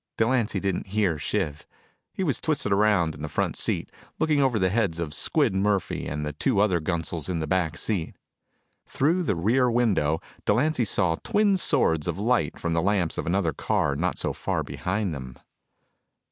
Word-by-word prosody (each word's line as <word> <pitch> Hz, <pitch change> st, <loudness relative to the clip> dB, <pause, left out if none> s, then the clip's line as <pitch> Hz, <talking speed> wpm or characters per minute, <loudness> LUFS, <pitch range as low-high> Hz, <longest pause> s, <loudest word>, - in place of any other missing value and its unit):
Delancy 115 Hz, -3 st, +1 dB
didn't 95 Hz, -1 st, -2 dB
hear 95 Hz, -6 st, 0 dB
Shiv. 75 Hz, 0 st, -2 dB, 0.4 s
He 190 Hz, -, -3 dB
was 145 Hz, -7 st, 0 dB
twisted 150 Hz, -9 st, 0 dB
around 100 Hz, -5 st, +3 dB
in 75 Hz, -, -11 dB
the 75 Hz, -, -4 dB
front -, -, -1 dB
seat, -, -, -2 dB, 0.3 s
looking 155 Hz, -2 st, +2 dB
over 130 Hz, -4 st, +2 dB
the 95 Hz, -3 st, +1 dB
heads 100 Hz, -6 st, 0 dB
of 80 Hz, -3 st, -4 dB
Squid -, -, +1 dB
Murphy 100 Hz, 0 st, 0 dB
and 75 Hz, 0 st, -3 dB
the 75 Hz, -, -4 dB
two 105 Hz, -, 0 dB
other 100 Hz, -4 st, +3 dB
gunsels 85 Hz, 0 st, -3 dB
in 85 Hz, -2 st, -1 dB
the 80 Hz, -, -2 dB
back 85 Hz, -1 st, 0 dB
seat. 95 Hz, -8 st, -2 dB, 0.7 s
Through 165 Hz, +7 st, +1 dB
the 160 Hz, -, 0 dB
rear 120 Hz, +9 st, +2 dB
window, 100 Hz, -11 st, +2 dB, 0.2 s
Delancy 130 Hz, +4 st, +2 dB
saw 85 Hz, -4 st, +1 dB
twin 205 Hz, -1 st, +3 dB
swords 85 Hz, -, +1 dB
of 85 Hz, 0 st, -2 dB
light 115 Hz, +5 st, 0 dB
from 85 Hz, -1 st, -1 dB
the 85 Hz, -, +2 dB
lamps 95 Hz, -3 st, 0 dB
of -, -, -4 dB
another 85 Hz, -3 st, +1 dB
car 70 Hz, +1 st, 0 dB
not 90 Hz, +5 st, -1 dB
so -, -, -2 dB
far -, -, -2 dB
behind 100 Hz, -1 st, -2 dB
them. 65 Hz, -3 st, -8 dB
95 Hz, 180 wpm, -26 LUFS, 80-115 Hz, 0.7 s, around